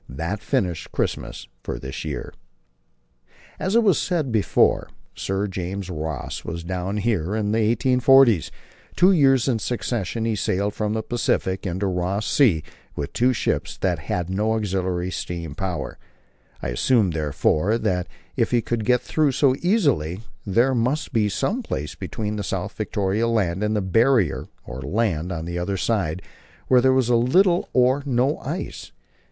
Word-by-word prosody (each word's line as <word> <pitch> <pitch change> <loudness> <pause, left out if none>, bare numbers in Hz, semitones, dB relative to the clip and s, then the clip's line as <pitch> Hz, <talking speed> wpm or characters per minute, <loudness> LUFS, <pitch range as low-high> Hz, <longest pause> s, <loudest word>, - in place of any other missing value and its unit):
That 85 - -3
finished 90 -5 -1
Christmas - - -3
for - - -4
this 65 0 -6
year. 70 -6 -5 1.3
As 190 +3 -1
has 235 - +5
been 200 -4 +5
said 160 -5 -1
before, 110 -3 +2 0.2
Sir 95 +1 -2
James 95 0 -4
Ross 80 -4 -4
was 85 0 -5
down 95 +3 -3
here 105 -3 0
in 105 -1 0
the 110 - +2 0.2
1840's. 125 - +4 0.5
Two 185 +2 +5
years 135 -7 +4
in 120 -4 +1
succession 115 -2 -2
he 115 -1 0
sailed 100 +1 0
from 105 0 -2
the 110 0 -2
Pacific 100 -5 -1
into 95 +3 -2
Ross 95 +2 -1
Sea 100 - +3 0.3
with 70 - -4
two 125 +2 +3
ships 125 - -1
that 90 -4 0
had 85 +3 -2
no 105 +4 0
auxiliary 95 -4 -1
steam 85 -3 -5
power. 90 -2 -4 0.6
I - - -1
assumed, 100 - +2
therefore, 80 +6 +1
that 90 -6 -1 0.3
if 115 -3 +1
he 120 -2 +2
could 115 -2 -2
get 125 +1 +3
through 150 -3 +1
so 135 0 +4
easily, 140 - +1 0.3
there 120 +7 +3
must 130 +6 0
be 110 -3 +2
some 215 - -1
place 75 - -4
between 105 -1 -4
South - - -3
Victoria 105 +3 0
Land 100 -6 0
and 105 0 0
the 105 - +1
Barrier 115 +3 +2 0.2
(or 65 0 -7
land) 90 - -1
on 80 -2 -4
the 85 +1 -3
other 95 +3 -2
side, 95 -4 -1 0.5
where 125 -1 +6
there 130 +1 +4
was 130 -2 +2
little 170 +10 +3
or 130 +2 +3
no 130 +3 +1
ice. - - -5
105 Hz, 160 wpm, -23 LUFS, 90-125 Hz, 1.3 s, where